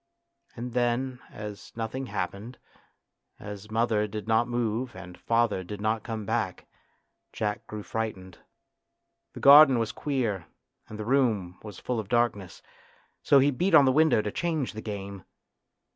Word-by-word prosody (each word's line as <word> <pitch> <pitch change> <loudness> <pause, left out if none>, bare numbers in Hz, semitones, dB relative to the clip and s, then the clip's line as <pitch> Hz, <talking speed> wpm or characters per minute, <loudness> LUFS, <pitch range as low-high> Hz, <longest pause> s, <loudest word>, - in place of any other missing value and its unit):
And 120 +1 -6
then 125 +1 0
as 105 -1 -9
nothing 115 +4 -4
happened, 105 +4 -5 0.8
as 105 0 -9
mother 110 -1 +1
did 105 +1 -6
not 110 +1 +3
move 120 0 -2
and 90 -1 -10
father 115 -4 0
did 105 +3 -7
not 110 +1 0
come 110 -2 -5
back, 110 -5 -2 0.7
Jack 105 -1 -3
grew 105 -1 -6
frightened. 95 -6 -5 0.9
The - - -9
garden 140 -2 +9
was 115 -2 -1
queer 115 - -2 0.4
and 110 - -8
the 110 - -5
room 110 -9 +1
was 105 -4 -10
full 125 -2 -3
of 105 -2 -6
darkness, 120 -6 -1 0.6
so 140 - +5
he 140 +2 +4
beat 175 +6 +2
on 145 - +8
the 130 - +4
window 155 -6 +4
to 105 - -3
change 155 -1 -2
the 110 - -7
game. 100 -3 -6
110 Hz, 150 wpm, -27 LUFS, 105-125 Hz, 0.9 s, garden